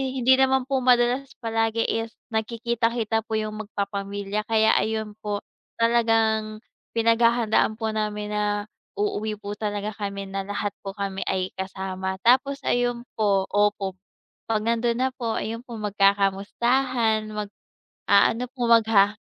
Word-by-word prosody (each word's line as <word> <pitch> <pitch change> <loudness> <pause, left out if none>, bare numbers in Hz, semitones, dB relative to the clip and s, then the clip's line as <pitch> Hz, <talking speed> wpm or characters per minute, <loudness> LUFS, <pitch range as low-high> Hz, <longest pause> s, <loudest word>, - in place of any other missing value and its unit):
hindi 260 +1 +4
naman 265 0 +3
po 270 +1 0
madalas 250 +1 +3 0.2
palagi 225 0 +1
is 225 0 -2 0.2
nagkikita-kita 230 0 0
po 220 - -2
yung 215 0 -3
mag-papamilya, 200 +1 -3
kaya 220 -1 +4
ayun 220 -1 -2
po, 205 -1 -3 0.4
talagang, 225 -2 +2 0.3
pinag-hahandaan 230 -1 +3
po 220 0 -3
namin 210 -1 -2
na 210 0 -1 0.2
uuwi 210 +1 -1
po 205 +1 -6
talaga 205 -1 -2
kami 200 -1 -4
na 195 0 -3
lahat 205 +1 -2 0.2
po 195 - -4
kami 195 -1 -3
ay 185 -1 -1
kasama, 190 0 -4
tapos 270 +4 +3
ayun 245 -1 0 0.2
po, 200 -2 +3
opo, 205 -2 +1 0.5
pag 220 -1 +1
nandun 235 +1 +1
na 260 - +2
po, 235 -3 -3
ayun 225 +1 -3
po, 235 - -7
mag-kakamustahan, 215 +4 +1
mag-aano 210 +2 0
po, 255 - -8
magha 215 -3 +5
220 Hz, 130 wpm, -25 LUFS, 205-230 Hz, 0.5 s, magha